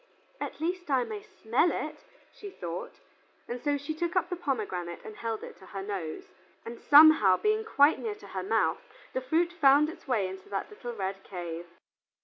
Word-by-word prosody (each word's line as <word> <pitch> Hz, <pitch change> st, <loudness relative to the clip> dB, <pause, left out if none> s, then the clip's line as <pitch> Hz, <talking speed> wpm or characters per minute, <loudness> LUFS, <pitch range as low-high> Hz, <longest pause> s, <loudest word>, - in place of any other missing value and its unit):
"At -, -, -5 dB
least 350 Hz, +1 st, -2 dB
I 265 Hz, -3 st, +3 dB
may 420 Hz, -, -6 dB
smell 345 Hz, -, +1 dB
it," -, -, -5 dB, 0.3 s
she 410 Hz, -, -9 dB
thought, 175 Hz, -, -7 dB, 0.6 s
so 290 Hz, -1 st, +1 dB
she 285 Hz, +3 st, -4 dB
took 340 Hz, +3 st, -3 dB
up 360 Hz, -1 st, +1 dB
the -, -, 0 dB
pomegranate 205 Hz, -, -3 dB
and 215 Hz, -, -8 dB
held 225 Hz, -1 st, -4 dB
it -, -, -9 dB
to 190 Hz, -, -15 dB
her 195 Hz, -1 st, -6 dB
nose, 190 Hz, -6 st, -4 dB, 0.4 s
and 230 Hz, 0 st, -8 dB
somehow, 290 Hz, -11 st, +8 dB
being 430 Hz, +1 st, +1 dB
quite 305 Hz, -9 st, +4 dB
near 435 Hz, -2 st, -3 dB
to 420 Hz, -, -14 dB
her 190 Hz, -, -4 dB
mouth, 190 Hz, -4 st, +1 dB, 0.3 s
the 260 Hz, -, -1 dB
fruit 330 Hz, +7 st, +1 dB
found 295 Hz, -2 st, +5 dB
its 325 Hz, -, -11 dB
way 225 Hz, -7 st, +1 dB
into 190 Hz, 0 st, -9 dB
that 195 Hz, -, -3 dB
little 245 Hz, -13 st, -7 dB
red 195 Hz, -1 st, -4 dB
cave. 175 Hz, -2 st, -6 dB
260 Hz, 185 wpm, -29 LUFS, -, 0.6 s, somehow